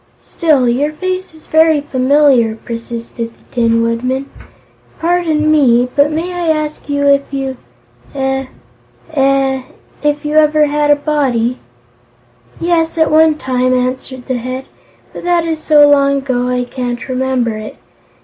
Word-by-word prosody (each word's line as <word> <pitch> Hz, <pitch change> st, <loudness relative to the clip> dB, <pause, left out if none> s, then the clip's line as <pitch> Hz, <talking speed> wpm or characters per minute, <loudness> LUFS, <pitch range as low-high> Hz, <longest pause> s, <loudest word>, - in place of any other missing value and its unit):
"Still, 295 Hz, -7 st, +1 dB
your 275 Hz, +6 st, +1 dB
face 370 Hz, +2 st, -4 dB
is 315 Hz, -, -18 dB
very 315 Hz, -1 st, +3 dB
familiar," 265 Hz, -4 st, +2 dB
persisted 230 Hz, 0 st, -7 dB
the -, -, -27 dB
Tin 230 Hz, -1 st, +2 dB
Woodman. 255 Hz, +4 st, -2 dB, 0.7 s
"Pardon 325 Hz, -3 st, +1 dB
me, 250 Hz, -5 st, +3 dB
but 285 Hz, 0 st, +4 dB
may 335 Hz, +4 st, -3 dB
I 350 Hz, -1 st, -3 dB
ask 305 Hz, 0 st, -4 dB
if 285 Hz, -1 st, +3 dB
you 270 Hz, -2 st, -4 dB, 0.6 s
eh 265 Hz, 0 st, -1 dB, 0.7 s
eh 270 Hz, -1 st, +2 dB, 0.4 s
if 295 Hz, 0 st, -1 dB
you 300 Hz, +1 st, 0 dB
ever 305 Hz, 0 st, +4 dB
had 295 Hz, 0 st, 0 dB
a 290 Hz, -, +6 dB
Body?" 270 Hz, -5 st, -1 dB, 1.0 s
"Yes, 335 Hz, -1 st, 0 dB
at 320 Hz, -1 st, +2 dB
one 315 Hz, 0 st, +5 dB
time," 255 Hz, -2 st, 0 dB
answered 255 Hz, 0 st, -3 dB
the 260 Hz, -2 st, -1 dB
Head, 255 Hz, +2 st, -5 dB, 0.5 s
"but -, -, -8 dB
that 345 Hz, -1 st, +1 dB
is 320 Hz, -1 st, -2 dB
so 300 Hz, -2 st, +5 dB
long 280 Hz, -1 st, +3 dB
ago 255 Hz, -2 st, -1 dB
I 250 Hz, 0 st, 0 dB
can't 245 Hz, -1 st, -5 dB
remember 255 Hz, -3 st, -1 dB
it. 215 Hz, 0 st, -8 dB
275 Hz, 140 wpm, -15 LUFS, 250-305 Hz, 1.0 s, a